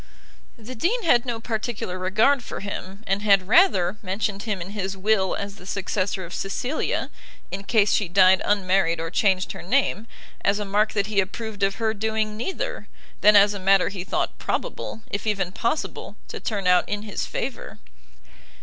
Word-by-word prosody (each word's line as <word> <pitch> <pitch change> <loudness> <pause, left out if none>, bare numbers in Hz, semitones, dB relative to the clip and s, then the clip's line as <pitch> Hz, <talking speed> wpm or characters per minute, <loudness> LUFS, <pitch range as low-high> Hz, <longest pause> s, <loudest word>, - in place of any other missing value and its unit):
The 230 +2 -9
dean 380 - 0
had 245 -6 +3
no 235 -2 -2
particular 220 -5 -4
regard 215 +9 +3
for - - -7
him, 200 0 -7
and 195 +1 0
had 195 -3 +4
rather 215 - +4
mentioned 200 +1 -2
him 205 -3 -3
in 180 +3 -6
his 195 -2 -4
will 195 -1 +2
as 200 0 -6
the 180 - -13
successor 190 -1 -2
of 170 - -10
Cecilia, 245 +9 -2 0.4
in 195 +1 -5
case 210 -1 +3
she 205 - +1
died 185 +1 +5
unmarried 185 -4 +2
or 165 0 -4
changed 190 -3 +1
her - - -8
name, 230 +1 0 0.4
as 200 +1 +2
a 210 - -3
mark 210 +2 +1
that 200 -2 +1
he 210 -1 0
approved 210 +2 -3
of 195 0 +2
her 220 -2 0
doing 220 0 -1
neither, - - -4 0.3
than 210 0 +7
as 205 0 +6
a 200 - -5
matter 195 0 +4
he 190 -3 -5
thought 185 - -2
probable, 220 - -4
if 200 +2 -3
even 195 -4 0
possible, 235 +10 -3
to - - -6
turn 205 -5 -3
out 180 0 +4
in 205 0 -2
his 210 -2 -4
favour. - - -5
200 Hz, 180 wpm, -24 LUFS, 190-220 Hz, 0.4 s, than